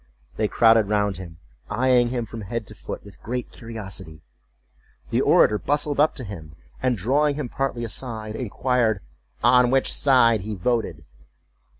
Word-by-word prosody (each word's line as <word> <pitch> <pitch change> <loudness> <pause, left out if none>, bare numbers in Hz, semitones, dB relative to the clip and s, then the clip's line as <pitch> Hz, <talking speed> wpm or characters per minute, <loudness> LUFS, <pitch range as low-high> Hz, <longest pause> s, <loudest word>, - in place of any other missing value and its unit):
They 110 - 0
crowded 115 -1 +4
round 105 -3 +1
him, 85 -4 -10 0.3
eyeing 125 -1 +3
him 120 -1 -2
from 115 +1 -8
head 110 +3 -4
to - - -12
foot - - -8
with 100 - -15
great 125 +1 -4
curiosity. 95 -9 -9 0.9
The - - +2
orator 105 0 +4
bustled 145 0 -1
up 155 +2 +4
to 130 - -7
him, 80 -8 -9 0.3
and, 125 -2 +1
drawing 140 +9 +1
him 145 -4 -4
partly 135 -3 -2
aside, 110 -2 -6
inquired 120 -2 0 0.4
"on 125 +1 +5
which 135 +1 +1
side 120 -6 +4
he 105 +2 -5
voted?" 115 +4 -1
115 Hz, 155 wpm, -23 LUFS, 105-125 Hz, 0.9 s, on